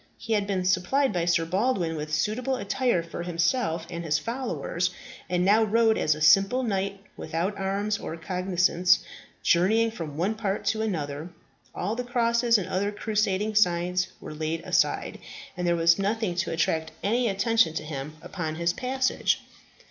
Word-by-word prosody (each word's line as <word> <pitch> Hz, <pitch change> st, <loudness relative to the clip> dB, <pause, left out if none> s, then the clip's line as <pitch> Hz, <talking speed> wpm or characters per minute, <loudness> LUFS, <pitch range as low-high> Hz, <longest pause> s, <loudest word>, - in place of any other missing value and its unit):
He 225 Hz, -, -3 dB
had 205 Hz, -2 st, +1 dB
been 190 Hz, -2 st, -1 dB
supplied 190 Hz, +8 st, +2 dB
by 175 Hz, -2 st, 0 dB
Sir 170 Hz, -1 st, +2 dB
Baldwin 185 Hz, -2 st, 0 dB
with 150 Hz, 0 st, -5 dB
suitable 220 Hz, -, 0 dB
attire 225 Hz, -4 st, 0 dB
for 170 Hz, -, -7 dB
himself 170 Hz, 0 st, 0 dB
and 170 Hz, -1 st, -6 dB
his 150 Hz, -2 st, +1 dB
followers, 180 Hz, -, -2 dB, 0.4 s
and 180 Hz, 0 st, +1 dB
now 210 Hz, +3 st, +5 dB
rode 220 Hz, +1 st, +3 dB
as 155 Hz, -, +2 dB
a 155 Hz, -, -9 dB
simple 195 Hz, +11 st, +5 dB
knight, 195 Hz, -3 st, -2 dB, 0.2 s
without 180 Hz, +6 st, -2 dB
arms 200 Hz, +2 st, -1 dB
or 165 Hz, -, -6 dB
cognizance, 180 Hz, 0 st, +2 dB, 0.5 s
journeying 220 Hz, +6 st, +3 dB
from 160 Hz, -9 st, -7 dB
one 190 Hz, +6 st, +1 dB
part 205 Hz, -3 st, -3 dB
to 220 Hz, -, +1 dB
another. 155 Hz, -6 st, -3 dB, 0.5 s
All 205 Hz, +5 st, -2 dB
the 250 Hz, -, -3 dB
crosses 235 Hz, -1 st, +2 dB
and 195 Hz, -, -3 dB
other 200 Hz, +2 st, -1 dB
crusading 210 Hz, -1 st, -1 dB
signs 180 Hz, -2 st, +2 dB
were -, -, -8 dB
laid 155 Hz, +1 st, -3 dB
aside, -, -, 0 dB, 0.4 s
and 180 Hz, -1 st, -2 dB
there 170 Hz, -, +3 dB
was 170 Hz, +2 st, +4 dB
nothing 205 Hz, -1 st, 0 dB
to 175 Hz, -1 st, -1 dB
attract 160 Hz, -1 st, 0 dB
any 235 Hz, +4 st, +2 dB
attention 200 Hz, -3 st, +2 dB
to 155 Hz, -, -2 dB
him 150 Hz, 0 st, -6 dB
upon 160 Hz, -4 st, -4 dB
his 170 Hz, +1 st, 0 dB
passage. 260 Hz, +3 st, 0 dB
190 Hz, 165 wpm, -26 LUFS, 170-220 Hz, 0.5 s, now